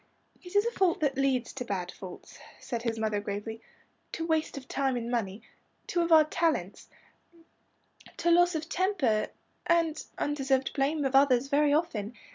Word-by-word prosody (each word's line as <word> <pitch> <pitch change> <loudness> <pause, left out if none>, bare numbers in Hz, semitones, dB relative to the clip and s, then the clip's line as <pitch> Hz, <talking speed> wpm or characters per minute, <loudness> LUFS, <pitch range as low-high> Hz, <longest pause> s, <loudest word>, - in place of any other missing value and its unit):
"It 360 +1 -11
is 410 +2 +4
a 470 - 0
fault 375 -7 +1
that 285 -3 +1
leads 265 -3 0
to 260 - -4
bad 185 -6 -3
faults," 185 -2 -11 0.2
said 235 -3 -4
his 230 -1 -2
mother 215 -2 0
gravely, 210 +2 -5 0.5
"to 330 - -3
waste 320 -3 0
of 260 -2 -8
time 270 -2 0
and 235 0 -4
money 215 -4 -2 0.4
two 345 - 0
of 340 0 -1
our 315 -1 +8
'talents' 305 - -1 1.3
to 340 - +2
loss 350 0 +5
of 315 0 -3
temper, 345 - +1 0.4
and 330 -2 +2
undeserved 270 -2 0
blame 290 +1 0
of 265 - 0
others, 270 -1 +4
very 290 0 +3
often. 245 -8 -1
275 Hz, 165 wpm, -29 LUFS, 230-325 Hz, 1.3 s, our